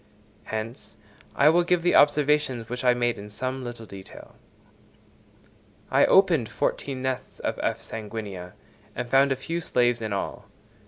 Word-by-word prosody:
Hence, 110 Hz, 0 st, -6 dB, 0.4 s
I 145 Hz, -, +6 dB
will 170 Hz, +2 st, +4 dB
give 175 Hz, -1 st, +1 dB
the 175 Hz, -, +3 dB
observations 145 Hz, -5 st, +3 dB
which 125 Hz, +1 st, -4 dB
I 125 Hz, -1 st, +4 dB
made 120 Hz, -2 st, 0 dB
in 105 Hz, +1 st, -9 dB
some 130 Hz, +5 st, -4 dB
little 120 Hz, -2 st, -7 dB
detail. 95 Hz, -2 st, -12 dB, 1.6 s
I -, -, +5 dB
opened 170 Hz, -, +4 dB
fourteen 130 Hz, +5 st, -2 dB
nests 130 Hz, -1 st, -4 dB
of -, -, -2 dB
F. -, -, -1 dB
sanguinea, 105 Hz, -5 st, -7 dB, 0.4 s
and 120 Hz, -, -5 dB
found 135 Hz, +1 st, +5 dB
a -, -, +2 dB
few 165 Hz, +6 st, -4 dB
slaves 120 Hz, -5 st, +1 dB
in 110 Hz, -1 st, -3 dB
all. 100 Hz, -, -4 dB
125 Hz, 150 wpm, -26 LUFS, 110-145 Hz, 1.6 s, I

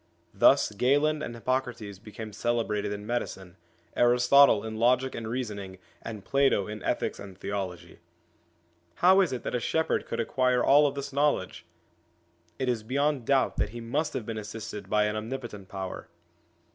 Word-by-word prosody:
Thus -, -, +5 dB
Galen 145 Hz, +8 st, +2 dB
and 120 Hz, -, -5 dB
Hippocrates 115 Hz, -5 st, -3 dB
became 110 Hz, 0 st, -9 dB
celebrated 110 Hz, -2 st, -1 dB
in 105 Hz, 0 st, -5 dB
medicine, 95 Hz, -6 st, -4 dB, 0.4 s
Aristotle 125 Hz, -1 st, +5 dB
in 110 Hz, 0 st, -5 dB
logic 125 Hz, +3 st, +2 dB
and 115 Hz, -1 st, -5 dB
reasoning, 105 Hz, -6 st, -5 dB, 0.2 s
and 110 Hz, -3 st, -8 dB
Plato 135 Hz, -8 st, +2 dB
in 105 Hz, -1 st, -7 dB
ethics -, -, -2 dB
and 95 Hz, -2 st, -10 dB
theology. 95 Hz, -4 st, -5 dB, 1.0 s
How 190 Hz, +2 st, +5 dB
is 180 Hz, -7 st, +1 dB
it 125 Hz, -, -4 dB
that -, -, -4 dB
a 125 Hz, -, +1 dB
shepherd 160 Hz, +6 st, 0 dB
could -, -, -4 dB
acquire 125 Hz, +1 st, +1 dB
all 145 Hz, +1 st, +6 dB
of 140 Hz, -, -3 dB
this 140 Hz, 0 st, -5 dB
knowledge? 140 Hz, -12 st, 0 dB, 0.9 s
It 130 Hz, -, -2 dB
is 120 Hz, -3 st, 0 dB
beyond 140 Hz, +2 st, -1 dB
doubt 135 Hz, -2 st, +2 dB
that -, -, 0 dB
he 120 Hz, +3 st, -8 dB
must 145 Hz, +7 st, -2 dB
have 115 Hz, -, -4 dB
been 110 Hz, -1 st, -4 dB
assisted 105 Hz, -2 st, -7 dB
by 105 Hz, 0 st, +3 dB
an 105 Hz, 0 st, -1 dB
omnipotent 110 Hz, -3 st, -6 dB
power. 95 Hz, -1 st, -6 dB
115 Hz, 160 wpm, -28 LUFS, 105-130 Hz, 1.0 s, all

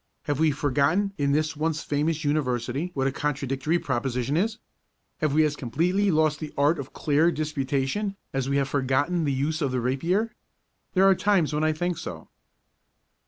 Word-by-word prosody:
Have 145 Hz, -1 st, -2 dB
we 160 Hz, 0 st, +4 dB
forgotten 145 Hz, +8 st, +1 dB
in 140 Hz, -1 st, +2 dB
this 155 Hz, +2 st, +1 dB
once 155 Hz, +1 st, -1 dB
famous 155 Hz, +2 st, -1 dB
University 135 Hz, +1 st, -1 dB
what 135 Hz, -1 st, 0 dB
a 135 Hz, -, +2 dB
contradictory 140 Hz, +2 st, -1 dB
proposition 130 Hz, -2 st, -1 dB
is? 215 Hz, +6 st, 0 dB, 0.6 s
Have 150 Hz, -2 st, 0 dB
we 155 Hz, 0 st, +5 dB
as 150 Hz, -1 st, -1 dB
completely 175 Hz, -, 0 dB
lost 155 Hz, -2 st, +2 dB
the 155 Hz, -2 st, -6 dB
art 145 Hz, +3 st, +3 dB
of 140 Hz, 0 st, -6 dB
clear 155 Hz, +3 st, +2 dB
disputation 150 Hz, +6 st, -1 dB, 0.2 s
as 135 Hz, 0 st, -1 dB
we 140 Hz, -, +1 dB
have 140 Hz, -1 st, +1 dB
forgotten 145 Hz, +5 st, +1 dB
the 140 Hz, -, +1 dB
use 150 Hz, +4 st, -1 dB
of 140 Hz, -, +1 dB
the 130 Hz, -, 0 dB
rapier? 170 Hz, -, 0 dB, 0.6 s
There 190 Hz, +1 st, +5 dB
are 195 Hz, -, +7 dB
times 190 Hz, -5 st, +2 dB
when 150 Hz, +1 st, 0 dB
I 155 Hz, -, +3 dB
think 175 Hz, +2 st, -2 dB
so. 80 Hz, -2 st, -7 dB
150 Hz, 175 wpm, -26 LUFS, 135-165 Hz, 0.6 s, are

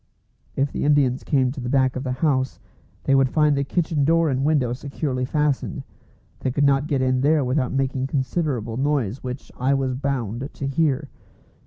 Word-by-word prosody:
If 140 Hz, +1 st, 0 dB
the -, -, -3 dB
Indians 140 Hz, -3 st, +2 dB
came 130 Hz, -4 st, +2 dB
to 135 Hz, -, -7 dB
the 125 Hz, -, -4 dB
back 130 Hz, -1 st, +2 dB
of 130 Hz, -, -3 dB
the 130 Hz, -, -2 dB
house, 130 Hz, -3 st, 0 dB, 0.4 s
they 135 Hz, -, +2 dB
would 135 Hz, -1 st, +4 dB
find 150 Hz, 0 st, +3 dB
the 140 Hz, -, +1 dB
kitchen 160 Hz, -1 st, 0 dB
door 165 Hz, +1 st, +3 dB
and 130 Hz, +1 st, 0 dB
window 140 Hz, -5 st, +2 dB
securely 135 Hz, -1 st, -3 dB
fastened. 150 Hz, 0 st, -1 dB, 0.6 s
They -, -, -1 dB
could 145 Hz, +3 st, 0 dB
not 140 Hz, +1 st, +3 dB
get 135 Hz, -3 st, 0 dB
in 130 Hz, 0 st, +1 dB
there 145 Hz, 0 st, +3 dB
without 130 Hz, 0 st, 0 dB
making 135 Hz, -1 st, -1 dB
considerable 130 Hz, -4 st, -2 dB
noise, 135 Hz, -5 st, 0 dB
which 125 Hz, +1 st, -6 dB
I 135 Hz, +2 st, +2 dB
was 135 Hz, -1 st, 0 dB
bound 130 Hz, -2 st, -3 dB
to 140 Hz, -, -6 dB
hear. 140 Hz, 0 st, 0 dB
135 Hz, 185 wpm, -23 LUFS, 130-145 Hz, 0.6 s, would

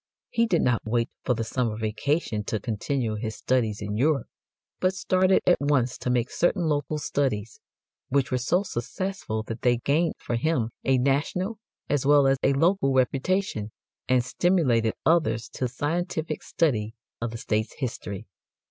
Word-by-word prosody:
He 230 Hz, 0 st, +2 dB
did 175 Hz, -6 st, +2 dB
not 120 Hz, -3 st, +2 dB
wait 115 Hz, +1 st, 0 dB
for 125 Hz, -, +1 dB
the 115 Hz, -, -2 dB
summer 115 Hz, -1 st, -1 dB
vacation 110 Hz, +1 st, -1 dB
to 110 Hz, -, -1 dB
continue 115 Hz, +2 st, -2 dB
his 110 Hz, +1 st, -4 dB
studies 110 Hz, -5 st, 0 dB
in 105 Hz, 0 st, -3 dB
Europe, 140 Hz, +3 st, +2 dB, 0.5 s
but 185 Hz, +1 st, +1 dB
started 185 Hz, 0 st, +3 dB
at 175 Hz, -, +4 dB
once 140 Hz, -4 st, +2 dB
to -, -, -2 dB
make 125 Hz, -1 st, +1 dB
certain 175 Hz, +1 st, +1 dB
local 150 Hz, -1 st, 0 dB
studies, 130 Hz, -7 st, -1 dB, 0.5 s
which 135 Hz, -1 st, +1 dB
were 130 Hz, -, +1 dB
so 175 Hz, +10 st, +1 dB
successful 185 Hz, -, -3 dB
that 115 Hz, +1 st, -6 dB
they 120 Hz, -1 st, +3 dB
gained 155 Hz, +7 st, +1 dB
for 120 Hz, -, -3 dB
him 125 Hz, -4 st, 0 dB
a 135 Hz, -1 st, +3 dB
national 150 Hz, -, 0 dB, 0.3 s
as 145 Hz, -2 st, +1 dB
well 145 Hz, 0 st, +5 dB
as 135 Hz, 0 st, +3 dB
a 140 Hz, -, +3 dB
local 165 Hz, 0 st, +2 dB
reputation, 130 Hz, -, 0 dB, 0.4 s
and 125 Hz, -2 st, +3 dB
stimulated 125 Hz, -10 st, +2 dB
others 135 Hz, -10 st, +2 dB
to 130 Hz, -, -3 dB
a -, -, -1 dB
scientific 160 Hz, +5 st, -2 dB
study 115 Hz, -9 st, 0 dB, 0.3 s
of 115 Hz, -, -1 dB
the 115 Hz, -, -6 dB
State's 110 Hz, 0 st, -1 dB
history. 110 Hz, -5 st, -4 dB
130 Hz, 165 wpm, -26 LUFS, 115-160 Hz, 0.5 s, well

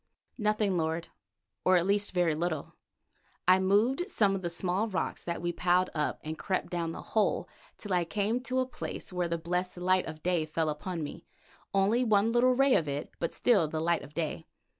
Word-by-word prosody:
"Nothing, 210 Hz, -3 st, +1 dB
lord, 160 Hz, +1 st, -1 dB, 0.5 s
or 185 Hz, 0 st, +5 dB
at 175 Hz, -, +1 dB
least 205 Hz, +1 st, +1 dB
very 175 Hz, -3 st, +2 dB
little. 160 Hz, -2 st, -2 dB, 0.7 s
I 185 Hz, +1 st, +7 dB
moved 225 Hz, -, +2 dB
some 205 Hz, -, +2 dB
of 195 Hz, -, -2 dB
the 175 Hz, -, -2 dB
small 180 Hz, +5 st, 0 dB
rocks 190 Hz, -4 st, -3 dB
that 170 Hz, -1 st, -4 dB
we 175 Hz, -, 0 dB
piled 180 Hz, +1 st, +2 dB
up, 150 Hz, -1 st, -1 dB
and 155 Hz, +1 st, -5 dB
crept 190 Hz, -2 st, -2 dB
down 170 Hz, -2 st, -1 dB
the -, -, -7 dB
hole 215 Hz, -2 st, +2 dB, 0.3 s
till 205 Hz, -3 st, -4 dB
I 175 Hz, -1 st, +3 dB
came 205 Hz, +7 st, 0 dB
to 255 Hz, 0 st, -1 dB
a 260 Hz, -, +2 dB
place 250 Hz, -6 st, -7 dB
where 180 Hz, -1 st, 0 dB
the 170 Hz, 0 st, -1 dB
blessed 180 Hz, +2 st, -2 dB
light 185 Hz, +1 st, +2 dB
of 155 Hz, -1 st, -8 dB
day 175 Hz, -3 st, +1 dB
fell 155 Hz, 0 st, 0 dB
upon 165 Hz, +2 st, -4 dB
me, 145 Hz, -, -8 dB, 0.4 s
only 200 Hz, +5 st, +3 dB
one 220 Hz, -1 st, +3 dB
little 250 Hz, +2 st, +4 dB
ray 270 Hz, 0 st, +4 dB
of 155 Hz, -, +2 dB
it, 145 Hz, +1 st, -4 dB
but 170 Hz, -, -1 dB
still 200 Hz, -10 st, +3 dB
the 155 Hz, +1 st, -3 dB
light 170 Hz, +1 st, +1 dB
of 145 Hz, +1 st, -12 dB
day. 160 Hz, 0 st, -3 dB
180 Hz, 205 wpm, -30 LUFS, 165-205 Hz, 0.7 s, I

